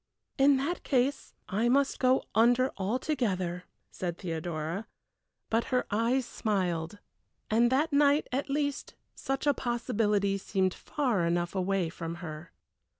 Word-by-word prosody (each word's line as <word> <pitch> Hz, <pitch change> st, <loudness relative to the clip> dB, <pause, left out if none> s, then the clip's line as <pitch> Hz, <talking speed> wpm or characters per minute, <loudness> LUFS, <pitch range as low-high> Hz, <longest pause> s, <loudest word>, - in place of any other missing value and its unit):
"In 275 Hz, 0 st, +6 dB
that 310 Hz, +7 st, -2 dB
case 270 Hz, +1 st, 0 dB
I 220 Hz, +5 st, +1 dB
must 275 Hz, +2 st, +2 dB
go 255 Hz, 0 st, +3 dB
under 245 Hz, +4 st, +4 dB
altogether," 195 Hz, -, -1 dB, 0.3 s
said 175 Hz, -2 st, -4 dB
Theodora; 165 Hz, +2 st, -4 dB, 0.6 s
but 225 Hz, +1 st, +2 dB
her 250 Hz, -1 st, 0 dB
eyes 235 Hz, +5 st, +1 dB
smiled, 185 Hz, -6 st, -2 dB, 0.5 s
and 235 Hz, +2 st, +4 dB
that 295 Hz, +4 st, +1 dB
night 290 Hz, +1 st, +4 dB
at 275 Hz, +3 st, -2 dB
least 285 Hz, 0 st, -2 dB, 0.2 s
such 270 Hz, +2 st, -3 dB
a 290 Hz, -, +4 dB
possibility 210 Hz, -5 st, 0 dB
seemed 190 Hz, -1 st, 0 dB
far 245 Hz, -11 st, -1 dB
enough 175 Hz, 0 st, 0 dB
away 190 Hz, -2 st, 0 dB
from 165 Hz, 0 st, -6 dB
her. 160 Hz, -2 st, -8 dB
225 Hz, 130 wpm, -29 LUFS, 180-265 Hz, 0.6 s, In